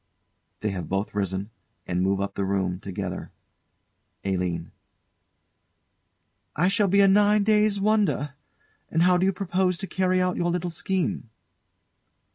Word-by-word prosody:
[They 105 - -1
have 90 -2 -5
both 95 +2 -2
risen, 100 +1 -2 0.3
and 90 0 -1
move 95 +1 +1
up 100 - -3
the 100 - -2
room 95 -2 -1
together. 95 -1 -5 0.9
ALINE. 90 -3 -2 1.8
I 175 +4 +3
shall 205 0 +2
be 200 +2 +4
a 195 - +6
nine 205 +1 +4
days' 210 -1 +3
wonder. 200 -8 +1 0.6
And 165 +1 +2
how 180 0 +5
do 185 +2 +2
you - - +3
propose 185 -1 0
to 195 - -5
carry 185 -1 +1
out 180 0 0
your 175 - 0
little 175 0 -2
scheme? 175 - -2
175 Hz, 140 wpm, -25 LUFS, -, 1.8 s, a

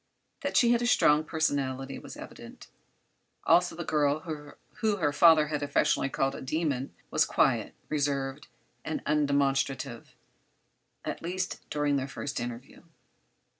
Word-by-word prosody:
That - - 0
she 240 -1 +5
had 240 0 +3
a 240 - +1
strong 150 -9 +4
personality 140 -4 -1
was - - -10
evident; - - -11 0.8
also 175 -1 +4
the 170 - -4
girl 150 -1 +1
whom 165 +7 -4
her 145 -3 +1
father 155 -1 +6
had 150 -1 -2
affectionately 140 -1 +1
called 135 0 0
a - - -7
"demon" 140 -1 -2 0.2
was - - +4
quiet, - - +1
reserved 140 -2 -2 0.4
and - - -4
undemonstrative—at 140 -4 -3
least 185 +2 -3
during 145 -1 +1
this 135 0 -3
first 140 -1 -4
interview. 120 +2 -7
145 Hz, 130 wpm, -29 LUFS, 135-160 Hz, 0.8 s, father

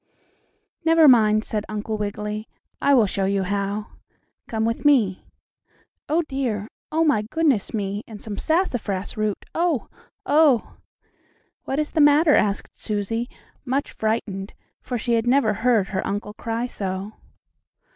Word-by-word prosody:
"Never 325 -1 +6
mind," 215 -4 +5
said 210 -2 -2
Uncle 215 +1 -3
Wiggily, 210 +1 -4 0.3
"I 280 - +5
will 235 -4 +5
show 195 0 -1
you 195 0 +1
how. 200 +2 -2 0.6
Come 220 -1 -1
with 230 +1 -2
me. 235 -11 +3 0.8
Oh, 325 +3 +2
dear! 250 -8 -3 0.2
Oh, 320 +1 +2
my 290 -9 +3
goodness 265 0 0
me, 205 0 -3
and 215 -2 -9
some 210 -1 -6
sassafras 245 - -1
root! 215 -2 -2
Oh! 335 -6 0 0.4
oh!" 290 -5 +3 0.9
"What 270 - -2
is 305 0 -1
the 315 - +2
matter?" 295 +2 +6
asked 205 -1 0
Susie, 225 +3 -2 0.3
much 275 +2 -1
frightened, 215 -3 -3 0.3
for 250 - -3
she 235 +1 -1
had 230 0 +1
never 245 -4 +3
heard 225 -3 +2
her 190 - -2
uncle 205 +1 -3
cry 230 +2 -3
so. 195 -3 -4
220 Hz, 140 wpm, -23 LUFS, 205-275 Hz, 0.9 s, Never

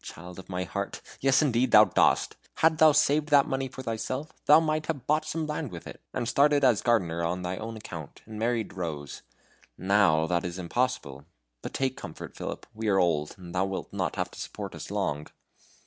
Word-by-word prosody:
Child 90 +2 -10
of 95 - -12
my 90 0 -2
heart! 90 - -4 0.2
Yes, 135 +3 +4
indeed 130 -2 +2
thou 105 -1 +8
dost. 95 - +2 0.2
Hadst 160 -1 +3
thou 155 -1 +8
saved 150 0 +2
that 145 -2 +6
money 135 0 -2
for 130 0 -9
thyself 130 +5 -4
thou 150 +2 +9
might 155 -1 -1
have 145 -6 -3
bought 155 +2 +1
some 155 +1 -2
land 150 -2 -3
with 85 -2 -9
it, - - -10
and 120 - -3
started 145 +3 +3
as 125 -5 +4
gardener 90 -8 +1
on 90 +2 -2
thy 90 +1 -3
own 115 +2 -6
account, 80 -8 -9
and 110 -1 -8
married 115 -1 -1
Rose. 80 -6 -5 0.6
NOW 95 -5 +3
that 85 +1 0
is 90 0 -4
impossible. 90 - -2 0.4
But - - -7
take 130 -1 -1
comfort, - - -9
Philip. - - -6
We 110 0 -4
are 100 -2 +3
old, 80 -5 +1
and 90 -2 -10
thou 95 +1 +1
wilt 95 0 -5
not - - -2
have - - -2
to - - -12
support - - -6
us - - -8
long." 75 +1 -2
110 Hz, 205 wpm, -28 LUFS, 90-140 Hz, 0.6 s, thou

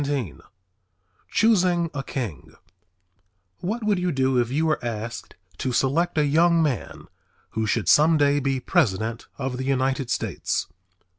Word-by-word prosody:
"_ 140 -7 -3 0.9
CHOOSING 180 -7 +2
A 140 - -3
KING 115 - -6 1.0
What 220 +6 -3
would 210 -3 +1
you 180 0 0
do 130 -2 +1
if 120 -1 0
you 150 +5 0
were 155 -5 0
asked 115 0 -5 0.2
to 130 - -1
select 160 +8 +1
a 150 - +4
young 165 +4 +4
man 140 -6 -3 0.5
who 110 0 -2
should 105 -3 0
some 155 - +5
day 145 0 +3
be 135 -1 -1
president 115 - 0
of 130 -2 -3
the 130 - -3
United 135 -1 0
States? - - -2
135 Hz, 145 wpm, -24 LUFS, 125-165 Hz, 1.0 s, some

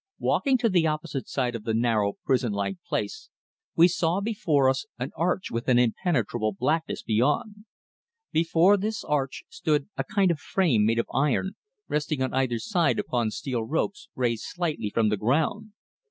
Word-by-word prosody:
Walking 270 -2 +2
to 240 -1 +1
the 175 -6 +3
opposite 155 -3 -3
side 125 -3 -1
of 115 - -6
the 110 0 -1
narrow, 110 -3 +1
prison 125 -4 +1
like 100 - -2
place, 440 0 -3 0.5
we 170 +1 +7
saw 170 +1 0
before 175 -10 +1
us 130 0 0
an 125 +2 -4
arch 175 +4 -1
with 115 +1 -3
an 125 -2 +4
impenetrable 120 - +1
blackness 155 +10 -1
beyond. 150 - 0 0.7
Before 170 +4 +4
this 215 +2 -3
arch 135 -3 -1
stood 150 -2 -1
a - - 0
kind 200 -4 +2
of 160 - -2
frame 135 - +2
made 115 +1 +1
of 115 - +1
iron 145 +7 +1 0.4
resting 150 -2 -1
on 130 - -2
either 130 -3 +1
side 170 - +1
upon 120 -3 0
steel 120 +2 -3
ropes 160 - -2
raised 120 -3 -1
slightly 160 -11 -2
from 110 +1 +2
the 105 - 0
ground. 160 - 0
145 Hz, 170 wpm, -26 LUFS, 120-175 Hz, 0.7 s, we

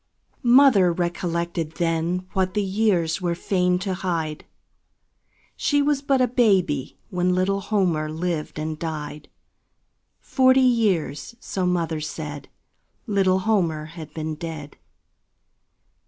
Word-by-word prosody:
Mother 240 -7 +6
recollected 170 -2 -2
then 170 +2 -1
What 190 0 0
the 210 - +1
years 190 -4 +1
were 175 -1 0
fain 180 0 +1
to 190 - -1
hide 165 -5 -3 1.1
She 290 -2 +1
was 285 -1 +1
but 275 -1 +1
a 255 - +3
baby 195 - +1
when 180 0 +1
Little 195 +2 +1
Homer 175 -7 0
lived 160 -1 -3
and 155 0 -4
died; 150 -2 -6 0.9
Forty 260 0 +3
years, 210 - +1
so 185 -5 -2
mother 165 -3 -1
said, 150 -2 -6 0.6
Little 190 -4 +2
Homer 175 -7 0
had 160 -3 -9
been 155 -1 -4
dead. 155 -2 -7
180 Hz, 115 wpm, -23 LUFS, 160-200 Hz, 1.1 s, Mother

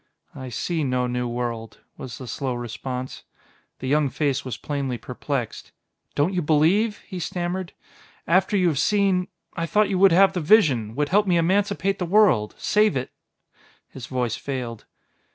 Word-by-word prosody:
"I 130 -1 -7
see 160 +7 -2
no 125 -2 0
new 125 0 -2
world," 120 -2 -4
was 120 -3 -8
the 130 - -8
slow 130 +1 -3
response. 125 +2 -5 0.6
The 130 - -6
young 145 +1 +2
face 140 +1 -1
was 125 -4 -5
plainly 140 -4 -3
perplexed. 125 0 -5 0.4
"Don't 150 +7 +1
you 180 - 0
believe?" 170 +8 +2
he 185 - -6
stammered. 175 +1 -3 0.5
"After 190 +4 +2
you 180 -2 +3
have 145 -4 -1
seen... 195 -1 +2 0.3
I 165 -1 -2
thought 210 +4 +2
you 190 -2 0
would 195 -1 +7
have 190 +3 +5
the 180 - -2
vision, 140 - +3
would 145 +1 0
help 205 +2 +3
me 175 -2 +3
emancipate 195 +3 +1
the 180 - -2
world, 180 - +3
save 210 -8 +2
it 130 - -4 0.4
" - - -32
His 130 -2 -8
voice 125 -4 -1
failed. 125 -5 -5
150 Hz, 170 wpm, -24 LUFS, 125-185 Hz, 0.6 s, would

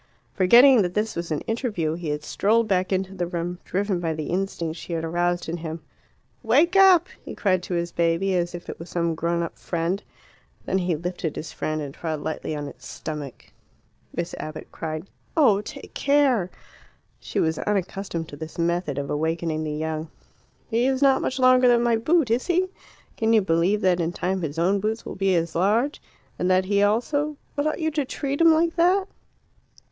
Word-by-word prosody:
Forgetting 240 +6 +7
that 180 -2 -2
this 215 +1 -1
was 170 0 -4
an 155 -2 -1
interview, 220 - -2
he 165 -1 -5
had 150 0 -2
strolled 220 +8 +2
back 185 -2 +1
into 190 0 -1
the 180 -2 -2
room, 175 0 -4
driven 195 -1 -1
by 165 -2 -2
the 155 0 -4
instinct 175 -3 -2
she 175 - -6
had 165 -1 -2
aroused 175 +1 0
in 165 +1 -3
him. 160 0 -5 0.6
"Wake 290 - +3
up!" 380 -3 +7 0.2
he - - -8
cried 185 -3 +1
to 180 - -4
his 170 0 -2
baby, 170 +3 +1
as 175 0 -1
if 175 - -9
it - - -7
was 165 - -9
some 170 -1 0
grown 170 +1 -1
up 165 - -7
friend. 170 +3 -2 0.6
Then 190 - +1
he 175 -2 0
lifted 170 -1 -4
his 155 - -6
foot 155 0 -2
and 140 -2 -6
trod 160 -1 -4
lightly 155 0 -4
on 145 -1 -4
its 130 -2 -11
stomach. 150 -4 -7 0.6
Miss 170 0 -4
Abbott 155 0 -7
cried, 155 +1 -5 0.3
"Oh, 220 -10 +5
take - - -10
care!" 270 -9 +2 0.7
She - - -3
was 160 -1 +1
unaccustomed 195 -4 -2
to - - -8
this 160 +3 -8
method 170 -3 0
of 140 0 -3
awakening 160 +1 -1
the 155 - -3
young. 155 +1 -3 0.6
"He 235 +2 +1
is 265 +1 +1
not 270 -1 +5
much 260 - -2
longer 255 -1 +5
than 240 -1 +4
my 235 -1 +3
boot, 270 +3 +2
is 240 +2 +1
he? 365 +1 +2 0.5
Can 225 0 +2
you 220 - +6
believe 175 +4 +2
that 185 -2 +3
in 170 +1 -1
time 185 +1 -1
his 155 -2 -4
own 185 +4 +2
boots 220 +3 -2
will - - -5
be 195 -1 +2
as 165 -1 0
large? 220 - +1 0.4
And 180 - +1
that 185 0 +3
he 200 +1 +2
also 285 +8 +1
" - - -38
"But 285 +1 0
ought 310 - -1
you 315 -1 0
to 295 -1 0
treat 280 +2 -3
him 330 0 +7
like 330 +1 +2
that?" 370 +3 +3
180 Hz, 200 wpm, -24 LUFS, 165-230 Hz, 0.7 s, Forgetting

